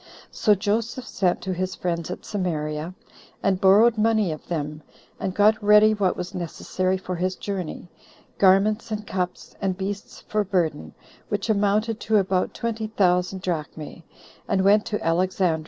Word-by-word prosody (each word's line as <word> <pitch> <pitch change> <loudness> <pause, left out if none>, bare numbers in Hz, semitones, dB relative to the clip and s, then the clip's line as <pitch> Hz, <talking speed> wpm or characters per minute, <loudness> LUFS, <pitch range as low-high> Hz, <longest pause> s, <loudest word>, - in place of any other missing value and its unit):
So 210 -2 +3
Joseph 225 +5 -2
sent 180 -3 0
to 185 +1 -3
his 185 +1 -3
friends 170 -2 -3
at 180 - -6
Samaria, 160 -3 -3 0.5
and 190 -1 +1
borrowed 215 +4 +5
money 215 -4 +2
of 155 - -8
them, 150 -2 -3 0.4
and 190 - -2
got 215 +1 +4
ready 210 +1 +6
what 200 -3 0
was 180 0 -5
necessary 185 +2 -2
for 185 -1 -5
his 185 +2 -1
journey, 185 -4 -5 0.5
garments 200 +4 +4
and 210 -1 -4
cups, 180 -2 -4
and 190 -2 -1
beasts 195 +1 -5
for 215 0 -1
burden, 165 - -1 0.3
which 205 +2 -1
amounted 210 +2 +1
to 220 -2 +2
about 190 -2 0
twenty 225 -1 -3
thousand 185 -2 +1
drachmae, 160 -2 -4 0.5
and 190 -1 +1
went 205 +2 +4
to 210 - -2
Alexandria. 175 0 +1
190 Hz, 155 wpm, -24 LUFS, 180-210 Hz, 0.5 s, ready